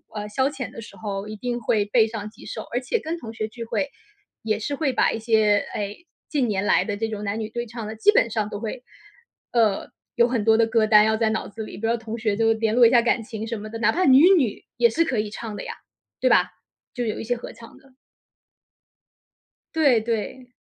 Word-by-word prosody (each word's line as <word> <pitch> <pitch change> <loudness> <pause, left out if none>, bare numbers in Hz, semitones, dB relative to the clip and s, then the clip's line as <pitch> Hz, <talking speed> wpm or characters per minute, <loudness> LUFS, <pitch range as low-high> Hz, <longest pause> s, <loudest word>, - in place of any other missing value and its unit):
呃， 210 0 -4
消 265 +4 +2
遣 275 -3 -5
的 - - -10
时 225 - -11
候 200 -1 -5
一 215 - -6
定 240 +2 -3
会 215 -2 +1
备 220 +2 +3
上 215 -2 -6
几 215 - -16
首。 - - -5
而 245 - +1
且 255 - -1
跟 325 +2 -4
同 225 -8 -8
学 220 -1 -4
聚 230 0 -7
会， 280 +5 -2 0.5
也 215 -1 0
是 285 +6 -3
会 280 -3 0
把 - - +3
一 - - -3
些， 215 -2 +3
哎， 205 -1 -3 0.4
近 280 -5 +1
年 205 -2 -1
来 - - +3
的 205 - -2
这 225 +2 -2
种 210 -1 -5
男 205 +2 -2
女 215 - -4
对 235 +1 -4
唱 230 -1 -7
的 220 +1 -7
基 420 - +5
本 235 - +3
上 215 -2 -1
都 205 - -5
会， 235 +2 -5 0.7
呃， 220 -5 +1 0.3
有 235 0 +4
很 235 -4 -1
多 220 -1 +5
的 230 - +4
歌 225 -1 +2
单 210 -1 +7
要 220 0 +2
在 220 -1 +2
脑 220 - -2
子 220 +2 -7
里， - - -9
比 225 - -4
如 - - +1
说 - - 0
同 225 0 -6
学 220 -3 0
就 225 +1 +3
联 220 0 0
络 245 -1 +7
一 - - +7
下 240 -2 +6
感 235 0 +1
情 220 0 -6
什 230 0 -3
么 215 +1 -8
的， 225 +1 -6
哪 230 - +3
怕 365 - 0
女 275 +7 +7
女 245 -9 -1
也 235 -1 +5
是 330 +9 +2
可 265 -7 -1
以 210 0 -2
唱 220 -1 -6
的 - - -6
呀， - - -5 0.5
对 - - +2
吧？ - - +4 0.4
就 245 -1 -2
有 215 - -3
一 - - -4
些 245 +2 -1
合 - - -8
唱 230 -1 -14
的 270 -1 -22 1.8
对 280 -8 +4
对。 230 +3 -3
225 Hz, 270 characters per minute, -24 LUFS, 215-245 Hz, 1.8 s, 单